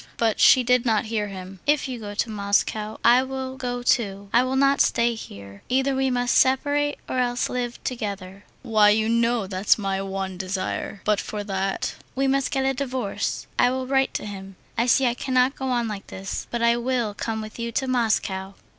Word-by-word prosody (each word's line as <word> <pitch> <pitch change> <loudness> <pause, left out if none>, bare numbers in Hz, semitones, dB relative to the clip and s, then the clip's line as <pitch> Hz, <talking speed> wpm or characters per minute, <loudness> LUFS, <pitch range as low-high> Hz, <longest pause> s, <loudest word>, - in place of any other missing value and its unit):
But 225 -2 +1
she 255 - +7
did 250 0 +3
not 225 -4 +1
hear 210 -2 0
him. 190 -1 -9
"If 295 -1 +2
you 255 -2 -5
go 205 -2 -7
to 225 - 0
Moscow, 210 +1 0
I 245 +2 +7
will 265 0 -5
go 245 -2 -4
too. 200 -5 0
I 240 - +6
will 255 +1 -1
not 275 +1 +4
stay 235 0 +2
here. 100 - -10
Either 265 +2 +2
we 265 0 +1
must 245 -1 +1
separate 290 +2 +2
or 255 - -1
else 245 -1 0
live 245 -1 -3
together." 200 -5 -5 0.2
"Why, 215 -4 +4
you 215 +1 +2
know, 230 -1 +2
that's 190 +1 +2
my 195 -2 -2
one 190 -1 -4
desire. 190 +1 -3
But 210 -1 +2
for 210 -1 -5
that...." 195 -1 -2 0.2
"We 270 +1 +1
must 270 0 +1
get 270 -1 0
a 270 - +2
divorce. 255 -5 -3
I 245 - +5
will 260 0 -2
write 270 0 +1
to - - -3
him. 195 -2 -8 0.2
I 235 +1 +1
see 265 +2 +4
I 240 - +2
cannot 255 +1 +1
go 265 - -5
on 240 -2 0
like 210 -2 -6
this.... 195 +1 -6
But 235 -1 -2
I 235 0 +4
will 240 -3 -1
come 220 +2 -3
with 215 +1 -8
you 235 0 -3
to 265 - -1
Moscow." 205 -6 0
235 Hz, 205 wpm, -24 LUFS, 200-255 Hz, 0.2 s, she